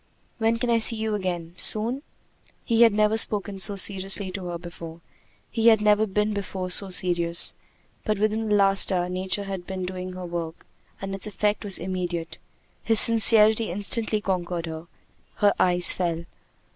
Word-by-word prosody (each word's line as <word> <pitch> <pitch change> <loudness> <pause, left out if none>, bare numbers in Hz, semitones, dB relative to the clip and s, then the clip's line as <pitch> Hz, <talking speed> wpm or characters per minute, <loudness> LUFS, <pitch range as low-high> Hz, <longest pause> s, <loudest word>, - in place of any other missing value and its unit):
"When 225 +1 +1
can 235 +1 -2
I 230 - +2
see 230 +1 +4
you 220 -1 -3
again 175 -4 -4
soon?" 230 +8 +1 0.6
He 230 -1 +1
had 230 -1 +6
never 215 +1 +1
spoken 205 -3 +2
so 200 +1 +1
seriously 195 0 +2
to 185 -1 -7
her 175 -1 -5
before. 170 -1 -11 0.5
He 225 0 0
had 220 -2 +5
never 210 +1 +2
before 200 -2 -3
been 180 - -7
so 195 +1 +2
serious. 175 -2 +2 0.5
But 215 -2 -2
within 215 +1 -2
the 210 - +2
last 195 0 +2
hour 180 -1 -1
Nature 185 +2 -3
had 195 -3 -7
been 190 -1 -5
doing 185 0 -7
her 185 0 -8
work, 170 -2 -7 0.3
and 195 0 -6
its 195 +2 -5
effect 210 +1 -2
was 200 -2 +1
immediate. 175 -2 -5 0.4
His 225 -2 +2
sincerity 220 -1 +4
instantly 210 +3 -2
conquered 175 -3 -3
her. 160 0 -9 0.5
Her 205 -1 +2
eyes 180 -1 +3
fell. 170 -2 -3
195 Hz, 170 wpm, -24 LUFS, 180-215 Hz, 0.6 s, had